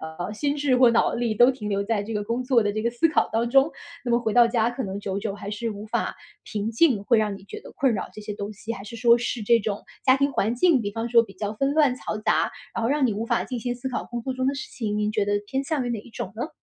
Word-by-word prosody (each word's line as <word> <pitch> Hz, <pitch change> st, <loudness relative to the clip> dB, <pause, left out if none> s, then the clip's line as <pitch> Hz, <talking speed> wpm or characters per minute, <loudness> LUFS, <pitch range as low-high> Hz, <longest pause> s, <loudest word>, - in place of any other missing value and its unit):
呃， 160 Hz, +5 st, -5 dB
心 285 Hz, +6 st, -1 dB
智 285 Hz, -3 st, +2 dB
或 250 Hz, -1 st, +6 dB
脑 230 Hz, -, +2 dB
力 235 Hz, -2 st, -1 dB
都 240 Hz, +4 st, +6 dB
停 235 Hz, -5 st, -5 dB
留 200 Hz, -1 st, 0 dB
在 215 Hz, -1 st, 0 dB
这 220 Hz, +2 st, -5 dB
个 210 Hz, -1 st, -2 dB
工 230 Hz, +4 st, -2 dB
作 250 Hz, -2 st, +3 dB
的 205 Hz, -1 st, 0 dB
这 215 Hz, -, -2 dB
个 235 Hz, -, +2 dB
思 240 Hz, +7 st, +2 dB
考 315 Hz, -, +2 dB
当 230 Hz, +1 st, 0 dB
中。 270 Hz, +4 st, +5 dB, 0.4 s
那 -, -, 0 dB
么 235 Hz, -, +4 dB
回 225 Hz, -3 st, -1 dB
到 240 Hz, 0 st, +6 dB
家 230 Hz, -1 st, +1 dB
可 245 Hz, +2 st, -4 dB
能 195 Hz, -2 st, -4 dB
久 195 Hz, -1 st, -3 dB
久 200 Hz, -1 st, -3 dB
还 200 Hz, 0 st, -7 dB
是 225 Hz, +2 st, -3 dB
无 205 Hz, 0 st, -7 dB
法 215 Hz, -, -2 dB, 0.3 s
平 210 Hz, 0 st, -3 dB
静， 230 Hz, -3 st, +3 dB
会 235 Hz, +2 st, +4 dB
让 210 Hz, -2 st, 0 dB
你 195 Hz, -, -15 dB
觉 -, -, -8 dB
得 -, -, -12 dB
困 265 Hz, -2 st, +3 dB
扰， 210 Hz, -, -3 dB
这 215 Hz, -, -10 dB
些 210 Hz, -, -5 dB
东 205 Hz, 0 st, -5 dB
西。 220 Hz, +3 st, -6 dB
还 195 Hz, -, -7 dB
是 215 Hz, +3 st, -9 dB
说 235 Hz, 0 st, +5 dB
是 240 Hz, -1 st, -3 dB
这 235 Hz, +3 st, +4 dB
种 205 Hz, -1 st, -3 dB, 0.2 s
家 260 Hz, 0 st, +5 dB
庭 280 Hz, +1 st, +1 dB
环 225 Hz, -1 st, +1 dB
境， 290 Hz, +2 st, +4 dB
比 205 Hz, -2 st, -3 dB
方 225 Hz, +3 st, -3 dB
说 230 Hz, -1 st, +6 dB
比 200 Hz, -4 st, -12 dB
较 205 Hz, +2 st, -3 dB
纷 275 Hz, +6 st, 0 dB
乱 290 Hz, -5 st, +4 dB
嘈 215 Hz, -, -5 dB
杂， -, -, +2 dB, 0.2 s
然 230 Hz, -, -2 dB
后 230 Hz, -, +1 dB
让 285 Hz, 0 st, +2 dB
你 230 Hz, -, 0 dB
无 215 Hz, +3 st, -3 dB
法 -, -, +1 dB
静 250 Hz, -3 st, -5 dB
心 245 Hz, +1 st, -2 dB
思 245 Hz, +2 st, -8 dB
考 255 Hz, -, -2 dB
工 240 Hz, -1 st, -5 dB
作 260 Hz, -, -2 dB
中 260 Hz, 0 st, -2 dB
的 275 Hz, -, +1 dB
事 270 Hz, -, -6 dB
情， 210 Hz, -3 st, -3 dB
您 210 Hz, 0 st, 0 dB
觉 210 Hz, -2 st, 0 dB
得 205 Hz, -, 0 dB
偏 265 Hz, +6 st, -1 dB
向 280 Hz, -2 st, -1 dB
于 -, -, -2 dB
哪 230 Hz, -3 st, -2 dB
一 -, -, -16 dB
种 195 Hz, -4 st, -6 dB
呢？ 245 Hz, +7 st, -3 dB
230 Hz, 330 characters per minute, -25 LUFS, 210-255 Hz, 0.4 s, 或